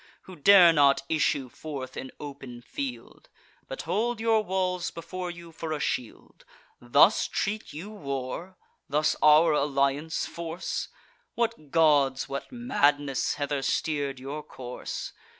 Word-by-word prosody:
Who 185 - -11
dare 175 +1 +7
not 140 -3 +4
issue 145 -4 +1
forth 135 0 -7
in 130 - -6
open 135 -4 -9
field, 280 - -7 0.4
But - - -6
hold 235 +2 -1
your 225 -1 +3
walls 185 -2 -1
before 180 +2 -6
you 170 -1 -10
for 160 0 -6
a 150 - -3
shield. 125 -4 -4 0.4
Thus 140 - +5
treat 215 +1 -3
you 175 +8 -8
war? 140 +1 -5 0.3
thus 150 +2 +2
our 155 +2 +6
alliance 140 +2 0
force? 170 +1 -4 0.5
What 230 -11 -2
gods, 145 -4 +3
what 140 - -6
madness, 145 - +1
hither 145 -1 -2
steer'd 140 -1 -1
your 140 +4 -5
course? 150 - -7
155 Hz, 130 wpm, -27 LUFS, 140-185 Hz, 0.5 s, dare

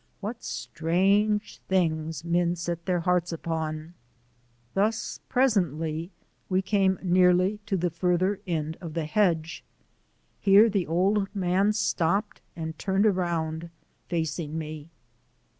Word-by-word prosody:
What 220 +4 -6
strange 185 - 0
things 160 -3 0
men 170 0 +1
set 170 0 -4
their 180 -2 +1
hearts 180 0 +1
upon! 160 -1 -4 0.8
Thus, 215 +3 0
presently, 170 - +1 0.4
we 190 0 +1
came 190 -1 +2
nearly 180 +2 +3
to 195 -3 0
the 175 0 0
farther 180 +3 +1
end 160 -2 -2
of 165 -3 -7
the 165 -2 -1
hedge. 170 -1 0 0.8
Here 205 +3 +6
the 195 -3 0
old 195 +5 +2
man 190 +2 +2
stopped 200 0 0
and 160 -1 -5
turned 195 +1 +1
around, 170 -4 0 0.4
facing 160 -2 -2
me. 155 -1 -6
175 Hz, 115 wpm, -27 LUFS, 160-195 Hz, 0.8 s, Here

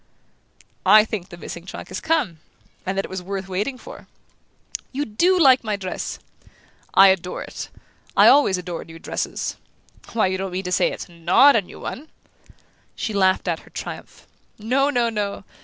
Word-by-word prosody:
"I 210 +3 +7
think 205 -5 -5
the 175 - -10
missing 170 +1 -8
trunk - - -8
has 185 - -5
come 290 - 0 0.5
and 190 +1 -1
that 195 - 0
it - - -10
was 190 -1 -5
worth 195 +1 -5
waiting 205 +8 -2
for!" - - -12 0.8
"You 285 +2 -2
DO 350 - +2
like 265 -6 +6
my 215 -2 -1
dress?" 190 -2 -5 0.8
"I 195 0 +9
adore 180 -1 -1
it! - - -7 0.5
I - - +8
always 280 -10 +5
adore 180 -1 -5
new 165 0 -12
dresses - - -4 0.6
why, 225 - +2
you 185 0 -1
don't 190 -1 -4
mean 185 +1 -2
to 180 - -4
say - - +2
it's - - -7
NOT 175 +12 +5
a 225 - +4
new 180 - -13
one?" 305 +4 -7 0.9
She 220 - -3
laughed 190 -2 +2
out - - 0
her - - -18
triumph. - - -8 0.3
"No, 260 +6 +1
no, 240 -4 +1
no! 205 -2 -3
195 Hz, 175 wpm, -22 LUFS, 185-245 Hz, 0.9 s, I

